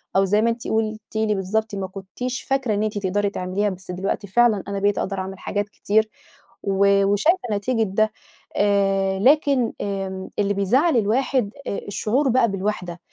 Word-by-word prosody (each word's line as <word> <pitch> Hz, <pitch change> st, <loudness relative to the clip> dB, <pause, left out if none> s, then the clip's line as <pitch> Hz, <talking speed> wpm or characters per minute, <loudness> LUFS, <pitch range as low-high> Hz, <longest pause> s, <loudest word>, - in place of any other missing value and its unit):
أو 195 Hz, 0 st, +4 dB
زي 210 Hz, +3 st, +2 dB
ما 230 Hz, -, +3 dB
أنتِ 230 Hz, 0 st, -3 dB
قُلتِ 220 Hz, 0 st, -1 dB
لي 220 Hz, -1 st, +1 dB
بالضبط، 210 Hz, +3 st, -1 dB
ما 195 Hz, -1 st, -3 dB
كُنتيش 200 Hz, +7 st, -5 dB
فاكرة 270 Hz, -5 st, 0 dB
إن 205 Hz, +1 st, 0 dB
أنتِ 215 Hz, -1 st, -2 dB
تقدري 200 Hz, +1 st, 0 dB
تعمليها 195 Hz, +2 st, -1 dB
بس 185 Hz, -1 st, -8 dB
دلوقتي 195 Hz, +3 st, -3 dB
فعلًا 220 Hz, -1 st, +3 dB
أنا 200 Hz, 0 st, -3 dB
بقيت 205 Hz, 0 st, +1 dB
أقدر 195 Hz, 0 st, -2 dB
أعمل 190 Hz, 0 st, -6 dB
حاجات 205 Hz, 0 st, -2 dB
كتير 215 Hz, +1 st, +1 dB, 0.5 s
و 200 Hz, 0 st, +3 dB
وشايفة 210 Hz, -, +3 dB
نتيجة 225 Hz, +3 st, 0 dB
ده، 215 Hz, +2 st, +1 dB, 0.4 s
آآ، 195 Hz, -1 st, +2 dB
لكن 270 Hz, 0 st, +3 dB
آمم، 195 Hz, -1 st, -4 dB
اللي 205 Hz, 0 st, +2 dB
بيزعَّل 245 Hz, -, +2 dB
الواحد 230 Hz, +1 st, +1 dB, 0.2 s
آآ -, -, -2 dB
الشعور 245 Hz, +7 st, 0 dB
بقى 235 Hz, -3 st, +3 dB
بالوِحدة 185 Hz, -3 st, -3 dB
205 Hz, 170 wpm, -22 LUFS, 195-225 Hz, 0.5 s, أو